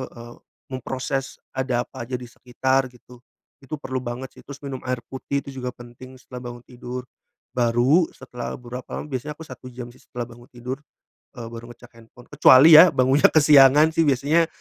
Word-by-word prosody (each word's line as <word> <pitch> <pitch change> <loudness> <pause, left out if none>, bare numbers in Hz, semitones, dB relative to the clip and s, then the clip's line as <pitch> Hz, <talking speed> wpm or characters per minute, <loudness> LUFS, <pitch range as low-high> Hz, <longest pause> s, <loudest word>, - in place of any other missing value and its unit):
eee, 120 0 -11 0.4
memproses 130 +1 -4 0.2
ada 125 -2 0
apa - - -8
aja 125 +2 -4
di 125 - -9
sekitar 130 +2 -1
gitu. 125 0 -17 0.4
Itu 145 +4 -5
perlu 130 -2 -5
banget 125 +2 -6
sih - - -18
terus 140 0 -10
minum 135 -2 -6
air 125 -1 -2
putih 140 +1 -3
itu 135 -1 -8
juga 125 - -3
penting 120 +2 -13
setelah 125 0 -10
bangun 120 0 -13
tidur. 125 0 -7 0.5
Baru 125 +7 +3
setelah 125 -1 -7
beberapa 125 +1 -7
lam - - -8
biasanya 135 +2 -4
aku 160 - -9
1 130 0 -11
jam 120 -1 -8
sih - - -21
setelah 120 -1 -6
bangun 120 +1 -15
tidur, 125 +2 -6 0.6
eee, 115 -2 -7
baru 115 0 -9
ngecek 120 0 -16
handphone. 120 +2 -18
Kecuali 145 +2 +8
ya 180 +2 +9
bangunnya 130 +3 +4
kesiangan 150 0 +6
sih 165 +1 +2
biasanya 145 +5 +2
130 Hz, 180 wpm, -23 LUFS, 120-135 Hz, 0.6 s, ya